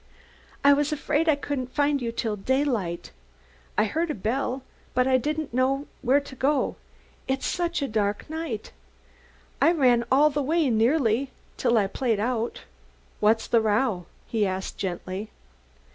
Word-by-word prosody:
"I 285 0 +8
was 290 +1 +1
afraid 305 +2 +1
I 305 - +5
couldn't 270 -3 -4
find 285 -1 +2
you 235 -1 -2
till 230 -2 -2
daylight. 215 -7 -1 0.7
I 210 - +5
heard 320 +10 -1
a 300 - -1
bell, 250 +5 -2 0.3
but 250 0 +3
I 260 0 +4
didn't 305 0 -3
know 270 +3 +1 0.2
where 265 +3 +4
to 280 -2 -11
go, 275 +2 +1 0.5
it's 265 0 -1
such 345 -3 -1
a - - 0
dark 210 -3 -1
night. 315 -8 -5 0.9
I 330 - +6
ran 250 -8 +4
all 295 +3 +5
the 290 +1 -1
way, 305 0 +2
nearly, 235 +2 +2 0.3
till 240 -2 +2
I 205 - +3
played 225 +2 -1
out." 235 +1 -2 0.6
"What's 220 +2 +3
the 230 - +3
row?" 210 -4 +1 0.2
he 220 -2 0
asked 190 -1 -2
gently. 185 +2 -4
255 Hz, 155 wpm, -26 LUFS, 220-285 Hz, 0.9 s, I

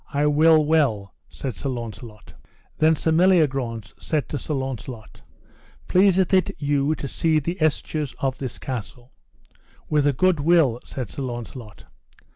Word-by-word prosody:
I 145 +1 +1
will 155 +1 +5
well, 130 -11 +1 0.2
said 130 -5 -6
Sir 140 - -4
Launcelot. 115 -3 -8 0.5
Then 160 +1 +4
Sir 160 - -1
Meliagrance 135 - +2
said 155 -3 -2
to 145 - -3
Sir 150 - -4
Launcelot: 130 -4 -6 0.7
Pleaseth 190 0 +3
it 185 -2 +2
you 145 +1 0
to 140 - -5
see 160 +3 +1
the 170 +5 -2
estures 155 -2 -1
of 135 -1 -2
this 130 -3 -5
castle? 125 -1 -7 0.8
With 150 -2 +2
a - - +4
good 185 +4 +2
will, 145 -6 +3
said 125 -6 -6
Sir - - -6
Launcelot. 120 -3 -7
140 Hz, 145 wpm, -23 LUFS, 125-155 Hz, 0.8 s, will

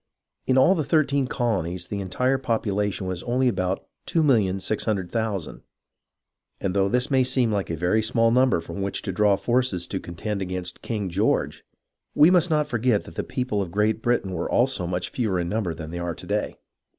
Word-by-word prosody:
In 130 - +3
all 135 +8 +6
the 165 -5 0
thirteen 140 -2 +2
colonies 95 -9 -2
the 100 - -4
entire 125 +8 0
popu 115 -5 -1
lation 105 0 -1
was 95 -1 -3
only 125 +4 +1
about 95 -5 -1 0.2
2,600,000/ 105 - 0 1.0
and 95 - -2
though 100 0 +2
this 125 +4 0
may 130 -1 +4
seem 125 -2 +1
hke 100 -3 -1
a 80 - -2
very 90 +7 +2
small 115 +1 +2
number 125 -5 +3
from 100 +4 -7
which 100 0 -3
to - - -2
draw 100 +2 +3
forces 120 -6 0
to - - -2
contend 100 +4 -5
against 90 -1 -4
King 105 -4 -3
George, 95 +5 0 0.5
we 155 +4 +7
must 180 -1 +4
not 150 -1 +2
forget 120 -5 +1
that - - -12
the - - -3
people 125 -5 -2
of 95 - -3
Great 105 +4 +1
Britain 120 -5 0
were 85 -2 -3
also 120 -8 +1
much 90 0 -2
fewer 105 -7 -1
in 85 0 -2
number 105 -4 -1
than 80 -1 -7
they 85 - -5
are 85 -1 -3
to - - -11
day. - - -2
105 Hz, 190 wpm, -24 LUFS, 95-125 Hz, 1.0 s, we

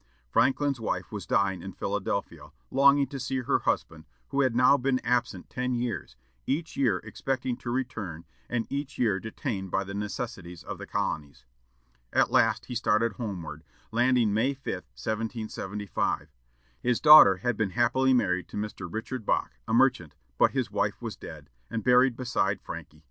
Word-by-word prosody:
Franklin's 140 0 +2
wife 115 - -3
was 100 -6 -6
dying 95 -2 +1
in 95 - -7
Philadelphia, 95 -6 -3 0.2
longing 140 +1 +5
to 135 +1 -7
see 130 +1 -2
her 125 - +1
husband, - - -2 0.2
who 140 - +1
had 130 -4 +2
now 125 +3 +6
been 135 -1 +1
absent 120 -6 0
ten 125 0 -2
years, 120 - -3 0.3
each 160 +4 -2
year 120 -9 +2
expecting 125 +3 -2
to 120 - -7
return, 110 -10 -3 0.2
and 120 -2 -1
each 140 0 -4
year 110 -6 +2
detained 105 -2 -4
by 95 +2 0
the 100 0 -7
necessities 100 -3 -5
of - - -7
the - - -8
colonies. 70 -5 -3 0.7
At - - +3
last 110 -1 +3
he 125 - -6
started 115 -1 +2
homeward, 85 - -6 0.3
landing 120 -2 +3
May 125 +6 +1
5, 135 - -32 0.3
1775. 105 - -3 0.5
His 125 -1 +1
daughter 150 -11 +9
had 120 +4 -1
been 110 -2 0
happily 130 +5 +3
married 90 -7 +1
to - - -8
Mr. 105 -4 -5
Richard 115 +3 -4
Bache, 60 -10 -1
a - - -1
merchant, 120 - +2 0.2
but - - +6
his - - -2
wife - - -1
was - - -5
dead, 75 -3 -11 0.2
and 115 -2 -3
buried 125 0 +5
beside 100 -6 0
Franky. 80 -4 -9
115 Hz, 165 wpm, -28 LUFS, 95-125 Hz, 0.7 s, daughter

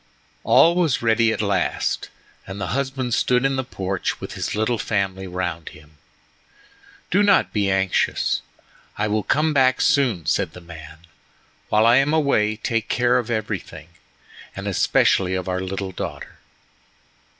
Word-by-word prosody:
All 170 - +5
was 160 -9 +1
ready 115 0 +3
at 110 - -2
last, 100 -3 -1 0.4
and 95 +1 -7
the 100 -3 -3
husband 130 -2 -2
stood 125 +2 +2
in 135 0 +1
the 130 - -1
porch 95 -6 -3
with - - -7
his - - -4
little 110 +2 0
family 95 -2 -2
round 90 -3 -4
him. 75 -1 -18 1.1
"Do 200 - +3
not 205 -2 +3
be 100 -2 +1
anxious, 95 -1 0 0.6
I 105 - 0
will 105 +1 0
come 155 +7 +1
back 130 -2 +3
soon," 130 - +2
said 80 - 0
the - - -10
man. 80 -2 -12 0.7
"While 110 +1 +3
I 120 +2 +6
am 145 +3 +2
away 110 -9 +2
take 115 0 -2
care 125 0 +2
of 120 -1 -5
everything, 105 -8 -4 0.7
and - - -6
especially 95 -1 +2
of 95 -1 -4
our 90 0 -2
little 95 0 -4
daughter." - - -7
110 Hz, 150 wpm, -22 LUFS, 95-130 Hz, 1.1 s, I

